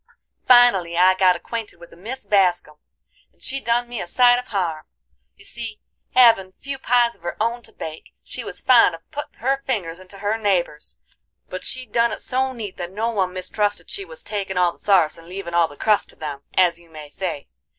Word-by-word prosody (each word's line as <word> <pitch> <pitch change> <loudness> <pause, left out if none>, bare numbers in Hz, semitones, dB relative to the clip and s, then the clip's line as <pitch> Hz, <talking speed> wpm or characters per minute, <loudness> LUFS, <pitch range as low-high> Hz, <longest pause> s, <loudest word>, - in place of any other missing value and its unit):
"Finally 200 -9 +5
I 185 +1 +6
got 185 -1 +4
acquainted 225 -6 -6
with 170 - -14
a - - -14
Mis 235 +10 -7
Bascum, 180 -6 +2 0.5
and - - -37
she 275 - -3
done 240 -1 0
me 240 -2 -4
a - - -5
sight 245 +5 +5
of 250 - -9
harm. 170 -7 -2 0.5
You - - -14
see, 230 -3 -6 0.4
havin' 225 -7 +5
few 275 -1 -5
pies 240 -2 +3
of - - -20
her 175 0 -5
own 230 +2 0
to - - -9
bake, 160 0 -8
she - - -6
was - - -6
fond 235 -9 +5
of 165 - -17
puttin' 290 +1 -7
her 270 +3 +1
fingers 180 -9 -2
into 185 +1 -12
her 205 +3 -1
neighborses, 180 -7 -1 0.5
but - - -6
she 255 0 -4
done 235 +1 +1
it - - -6
so 265 +1 0
neat 220 -6 -7
that 175 -1 -5
no 225 +4 -1
one 190 -4 0
mistrusted 205 +3 -2
she 400 - -4
was - - -9
takin' 195 -3 -4
all 180 -1 +3
the - - -19
sarce 175 -6 +3
and 165 - -15
leavin' 185 -2 -6
all 170 -1 +4
the 145 -2 -14
crust 215 -2 +2
to - - -16
them, 145 -3 -6
as 175 -2 +3
you 170 -1 -20
may 155 -2 -10
say. 170 -6 -4
200 Hz, 215 wpm, -22 LUFS, 175-240 Hz, 0.5 s, I